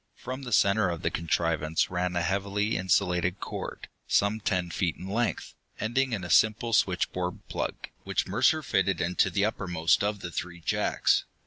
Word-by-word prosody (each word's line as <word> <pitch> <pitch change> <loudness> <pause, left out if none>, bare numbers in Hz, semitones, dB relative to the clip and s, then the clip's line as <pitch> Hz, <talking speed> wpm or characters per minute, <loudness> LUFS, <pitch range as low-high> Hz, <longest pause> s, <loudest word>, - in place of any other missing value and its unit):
From 130 +2 -6
the 125 -2 -7
center 100 -1 +4
of 85 -2 -4
the - - +1
contrivance 80 -1 0
ran 90 0 -1
a 85 - +1
heavy 100 +4 0
insulated 90 0 +1
cord, - - -6 0.2
some 100 +2 +2
ten 90 -4 -1
feet 85 -1 -1
in 90 - -9
length, 115 +5 -1 0.3
ending 130 +4 0
in 105 -5 -2
a 85 - -6
simple 110 +4 +3
switchboard 90 -2 0
plug, - - -2 0.3
which - - -1
Mercer - - +2
fitted - - +1
into 90 +1 +2
the 100 0 +1
uppermost 90 -7 +1
of 105 -1 -1
the 85 - -5
three 85 +1 -5
jacks. 85 - +1
95 Hz, 165 wpm, -28 LUFS, 85-105 Hz, 0.3 s, center